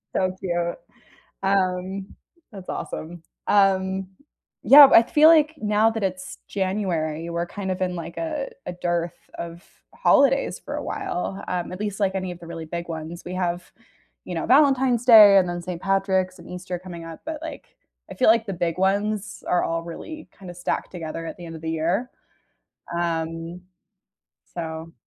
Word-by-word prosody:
so 185 0 +1
cute, 175 -2 -1 0.7
um, 190 0 0 0.5
that's 195 -3 -10
awesome, 165 +1 -6 0.3
um, 190 -1 +2 0.6
yeah, 280 0 +10
I 230 - +9
feel 300 +6 +5
like 315 -1 +5
now 215 -1 +2
that 225 -1 -4
it's 185 -1 -4
January, 175 -5 -2
we're 170 +1 -2
kind 190 0 -5
of 185 - -3
in, 180 -1 -1
like, 170 0 -7
a 305 -4 -3 0.2
a 180 - -3
dearth 175 -1 -2 0.2
of 170 +1 -7 0.3
holidays 275 -1 +3
for - - -6
a - - -4
while, 190 +2 -4
um, 180 -1 -3
at 185 - -7
least, 210 -1 -3
like, 195 -1 +1
any 185 -1 -2
of 175 - -10
the 170 - -11
really 165 -1 -7
big 170 +2 -6
ones, 160 +1 -6
we 180 - -6
have, 175 -1 -2 0.5
you 180 - -6
know, 165 - -2
Valentine's 265 -3 +4
Day, 215 -5 +9
and 180 -2 +2
then 175 0 -4
Saint 175 -1 -6
Patrick's 190 -1 0
and 170 - -13
Easter 180 0 -5
coming 175 -2 -9
up, 165 -1 -9
but, 320 -1 -4
like, 320 - -9 0.3
I - - -7
feel, 255 - +2
like, 225 0 +4
the 195 - -3
big 170 -1 -2
ones 205 +2 0
are 180 - +2
all 165 0 -1
really 310 - -9
kinda 180 -2 -9
stacked 175 - -3
together 165 -1 -6
at - - -7
the 175 - -10
end 165 0 -8
of 160 - -12
the 160 - -3
year, 175 +10 -1 0.9
um, 165 0 -3 0.9
so 160 -1 -6
185 Hz, 175 wpm, -24 LUFS, 170-205 Hz, 0.9 s, yeah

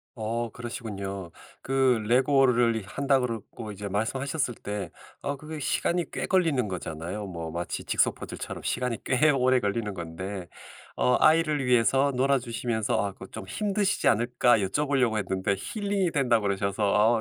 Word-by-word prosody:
어. 115 +1 -2
그러시군요. 100 -6 -6 0.3
그 130 -3 +2
레고를 125 -2 +3
한다고 135 +2 +1
그러고 115 -1 -6
이제 100 0 -6
말씀하셨을 130 +6 -1
때 105 -2 -5 0.3
어 140 0 -3
그게 155 +3 -8
시간이 170 +5 0
꽤 - - -3
걸리는 165 - +2
거잖아요. 90 +2 -5
뭐 85 -3 -6
마치 85 +1 -4
직소 - - +2
퍼즐처럼 - - -7
시간이 125 -3 -1
꽤 140 +4 +4
오래 130 -2 +3
걸리는 105 0 -1
건데. 90 +2 -6 0.5
어 125 -1 +3
아이를 155 -3 +4
위해서 125 +3 +3
놀아주시면서 120 -4 0
아 100 - -4
그 95 - -11
좀 95 - -8
'힘드시지 200 - 0
않을까?' 120 +1 +3
여쭤 100 +10 0
보려고 125 -6 +2
했는데 95 -1 0
"힐링이 200 - -1
된다."고 125 -7 +2
그러셔서 100 +3 +2
120 Hz, 345 characters per minute, -27 LUFS, 100-135 Hz, 0.5 s, 꽤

